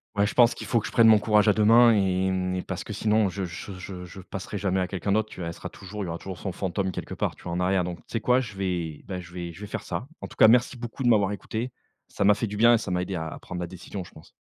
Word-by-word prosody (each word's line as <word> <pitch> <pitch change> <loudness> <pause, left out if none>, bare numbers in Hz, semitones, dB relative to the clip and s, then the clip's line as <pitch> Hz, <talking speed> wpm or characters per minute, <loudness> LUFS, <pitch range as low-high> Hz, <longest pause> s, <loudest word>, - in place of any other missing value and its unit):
Ouais, 100 0 +3
je - - -5
pense 120 -1 +6
qu'il - - -8
faut 115 - +2
que 105 - -6
je - - -5
prenne 115 -1 +6
mon 110 -1 +8
courage 105 0 +3
à 105 - +6
2 105 0 +2
mains 115 +2 +7
et 95 -2 +1
parce - - -4
que - - -6
sinon 110 -2 +2
je 95 +1 -4
je 90 +3 -7
je 90 -1 -7
je 90 +2 -11
passerai 100 +2 -6
jamais 95 -1 0
à 90 - 0
quelqu'un 95 +1 -3
d'autre. 110 +1 +2
Tu - - -8
là 85 - -3
elle 85 - -4
sera - - -7
toujours 100 +2 -7
il - - -3
y - - -5
aura 85 0 -4
toujours 95 -2 -7
son 95 - -4
fantôme 95 +1 -2
quelque - - -6
part, - - -2
tu - - -18
vois, 85 - -5
en 90 - -1
arrière. 90 0 +2
Donc 90 -1 -4
tu - - -22
sais 115 - -2
quoi? 125 +3 +4
Je 110 -6 -5
vais, 90 -5 -3
bah, 95 -2 -4
je 85 -1 -11
vais 85 -1 -5
je 85 - -13
vais - - -5
faire 105 - -5
ça. 95 +8 -5
En - - -5
tout - - -14
cas, - - +8
merci 120 +3 +4
beaucoup 120 +2 -7
de 125 - +3
m'avoir 105 -4 +4
écouté, 110 +4 -4 0.4
ça - - -2
m'a 105 +1 +6
fait 115 - -2
du 105 -1 -5
bien 120 +2 +6
et - - +3
ça 100 - -5
m'a 90 0 +1
aidé 90 +1 -3
à 80 -2 -3
à 80 - -8
prendre 90 - -7
ma 90 - -2
décision, 95 +2 -7
je - - -14
pense. 80 - -16
95 Hz, 335 wpm, -26 LUFS, 90-110 Hz, 0.4 s, mon